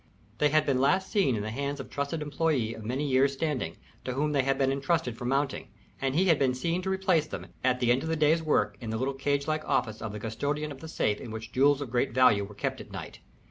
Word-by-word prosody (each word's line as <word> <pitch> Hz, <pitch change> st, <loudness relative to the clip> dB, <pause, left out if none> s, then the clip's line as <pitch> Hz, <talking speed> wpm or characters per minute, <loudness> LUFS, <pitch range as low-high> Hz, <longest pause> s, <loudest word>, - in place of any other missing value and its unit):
They 150 Hz, -, +4 dB
had 155 Hz, +1 st, +3 dB
been 130 Hz, -2 st, +1 dB
last 190 Hz, +7 st, +2 dB
seen 190 Hz, -, +3 dB
in 105 Hz, -, -2 dB
the 110 Hz, -, -4 dB
hands 140 Hz, +4 st, -3 dB
of 135 Hz, -, -5 dB
a -, -, -19 dB
trusted 140 Hz, +3 st, -3 dB
employé 145 Hz, -6 st, 0 dB
of 110 Hz, -, -9 dB
many 130 Hz, +7 st, -2 dB
years' 135 Hz, +1 st, +3 dB
standing, 135 Hz, -, -2 dB, 0.3 s
to 130 Hz, -, -3 dB
whom 150 Hz, +3 st, 0 dB
they 140 Hz, -2 st, +3 dB
had 135 Hz, +1 st, +1 dB
been 135 Hz, -1 st, +2 dB
intrusted 140 Hz, -2 st, 0 dB
for 120 Hz, -, -7 dB
mounting, 135 Hz, +2 st, 0 dB, 0.3 s
and 135 Hz, 0 st, 0 dB
he 185 Hz, +4 st, +3 dB
had 165 Hz, -6 st, +4 dB
been 130 Hz, -2 st, +2 dB
seen 170 Hz, +7 st, -1 dB
to 190 Hz, -, -3 dB
replace 190 Hz, -5 st, +2 dB
them, -, -, -6 dB, 0.2 s
at 125 Hz, -1 st, +2 dB
the 120 Hz, -1 st, +3 dB
end 125 Hz, +2 st, +3 dB
of 160 Hz, -, -4 dB
the 160 Hz, -, +1 dB
day's 155 Hz, +1 st, +3 dB
work, 155 Hz, -2 st, +1 dB
in 115 Hz, -, -5 dB
the 110 Hz, -, -1 dB
little 130 Hz, +3 st, -1 dB
cage 140 Hz, +1 st, 0 dB
like 155 Hz, 0 st, 0 dB
office 110 Hz, -1 st, -1 dB
of 110 Hz, -, -4 dB
the 105 Hz, -, -6 dB
custodian 145 Hz, +8 st, -2 dB
of 135 Hz, -, -9 dB
the 160 Hz, -, -8 dB
safe 105 Hz, -9 st, 0 dB
in 120 Hz, -, -7 dB
which 110 Hz, 0 st, -7 dB
jewels 140 Hz, +2 st, +3 dB
of 135 Hz, -5 st, -5 dB
great 125 Hz, 0 st, +1 dB
value 125 Hz, -6 st, +5 dB
were 100 Hz, +1 st, -9 dB
kept -, -, -3 dB
at -, -, -12 dB
night. -, -, -8 dB
135 Hz, 270 wpm, -28 LUFS, 125-150 Hz, 0.3 s, value